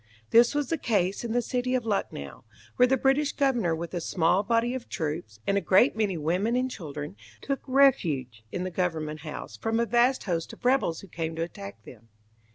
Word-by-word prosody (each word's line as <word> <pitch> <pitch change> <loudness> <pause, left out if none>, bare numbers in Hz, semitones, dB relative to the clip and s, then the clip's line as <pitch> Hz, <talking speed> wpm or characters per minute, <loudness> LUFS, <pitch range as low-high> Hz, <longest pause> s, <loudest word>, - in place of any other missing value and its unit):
This 235 +4 +6
was 290 -3 0
the 330 - -1
case 200 -5 0
in 235 - -3
the 245 +1 +1
city 250 +1 -1
of 245 -2 -1
Lucknow, 195 - -3 0.3
where 250 - +5
the 265 +1 +3
British 270 +3 +2
governor 245 - +1
with 170 +1 -6
a 175 - -2
small 170 +2 +2
body 230 +3 +1
of 260 -2 -6
troops, 150 - -4
and 200 0 +2
a - - -8
great 195 +8 +4
many 205 -5 0
women 180 +9 0
and 255 +1 0
children, 150 - -6 0.2
took 275 -1 -3
refuge 155 - +2
in 180 - -3
the 185 - -3
Government 160 -4 -2
House 155 0 -7
from 225 0 -1
a 235 - +2
vast 240 +4 +3
host 170 -4 -2
of - - -14
rebels 250 -11 +2
who 195 - -12
came 165 -2 -4
to 165 - -1
attack 200 +3 -8
them. 115 -2 -14
200 Hz, 205 wpm, -27 LUFS, 165-245 Hz, 0.3 s, This